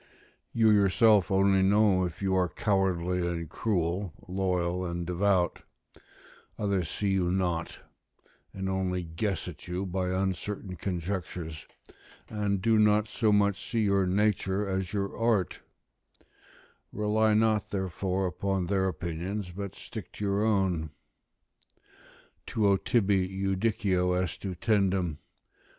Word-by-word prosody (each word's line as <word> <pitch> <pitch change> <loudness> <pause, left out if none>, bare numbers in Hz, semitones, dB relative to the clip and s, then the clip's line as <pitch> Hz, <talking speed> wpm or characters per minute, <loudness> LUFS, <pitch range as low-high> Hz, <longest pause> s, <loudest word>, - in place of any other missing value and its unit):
You 110 -1 +4
yourself 105 0 +4
only 95 0 +3
know 100 -1 +4
if 90 +2 -6
you 95 -1 +1
are 90 -1 +2
cowardly 90 -4 0
and 85 -2 -2
cruel, 90 -1 -1
loyal 90 -1 -1
and 85 -1 -3
devout: 90 0 +1 1.0
others 100 -5 -1
see 100 - -2
you 95 -2 +1
not, 90 -3 -1 0.7
and 95 0 -4
only 95 -1 -1
guess 85 +4 -3
at 85 -1 -9
you 90 +2 -3
by 90 0 -2
uncertain 95 +1 -2
conjectures, 85 -3 -4 0.6
and 100 -3 -1
do 110 -1 +4
not 105 0 +4
so 110 0 +1
much 100 0 +1
see 115 - 0
your 100 -2 +2
nature 100 0 +1
as 95 -2 -2
your 100 -1 -2
art; 115 -6 +1 1.3
rely 105 +1 +2
not 110 -2 +2
therefore 95 0 -2
upon 95 +1 -1
their 95 +1 +1
opinions, 90 +3 -4
but 100 +2 -6
stick - - -9
to - - -7
your 100 +1 +1
own: 95 -7 +1 1.6
"Tuo 100 -3 +3
tibi 95 -1 +1
judicio 95 -2 0
est 90 -3 -3
utendum.... 95 -4 0
95 Hz, 120 wpm, -28 LUFS, 90-100 Hz, 1.6 s, You